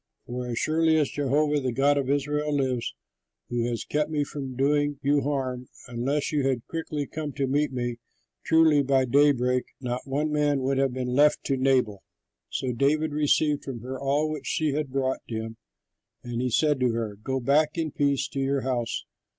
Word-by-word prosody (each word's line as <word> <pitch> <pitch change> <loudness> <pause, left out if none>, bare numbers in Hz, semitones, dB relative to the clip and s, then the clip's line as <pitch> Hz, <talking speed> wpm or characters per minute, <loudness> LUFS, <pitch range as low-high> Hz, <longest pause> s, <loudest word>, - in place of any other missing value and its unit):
For 125 +1 -5
as 120 -1 -3
surely 160 +2 +2
as 150 -3 +1
Jehovah 145 +1 +1
the 130 -2 -1
God 140 +4 +3
of 140 -2 -1
Israel 150 +1 0
lives, 130 -4 -1 0.5
who 120 -1 0
has 120 -2 -2
kept 150 0 0
me 150 -2 0
from 135 -3 -6
doing 145 +2 +1
you 145 +1 +3
harm, 130 -3 -2 0.2
unless 135 +6 -1
you 150 -2 +1
had 130 -3 -1
quickly 155 -3 -3
come 150 0 -5
to 140 -2 -1
meet 145 +2 +1
me, 120 -2 -3 0.5
truly 160 -2 +5
by 135 -1 +2
daybreak 125 -1 +3 0.2
not 125 0 -4
one 150 +3 -1
man 145 -2 +1
would 135 +1 +1
have 135 -1 +2
been 125 0 -3
left 145 +3 +4
to 135 - 0
Nabal." 130 -7 +1 0.5
So 130 - -2
David 150 +5 +1
received 150 0 +2
from 125 -4 -6
her 130 +2 -6
all 140 +3 +1
which 155 -2 -5
she 155 -2 0
had 145 0 -2
brought 130 0 -1
him. 110 0 -5 0.7
And 120 0 -3
he 125 - 0
said 150 +3 +2
to 125 -2 +2
her, 115 -3 -3
"Go 130 +5 -2
back 150 +5 +2
in 160 -2 -1
peace 140 -1 +1
to 140 - -4
your 135 0 0
house. 125 -3 -2
135 Hz, 190 wpm, -26 LUFS, 125-150 Hz, 0.7 s, truly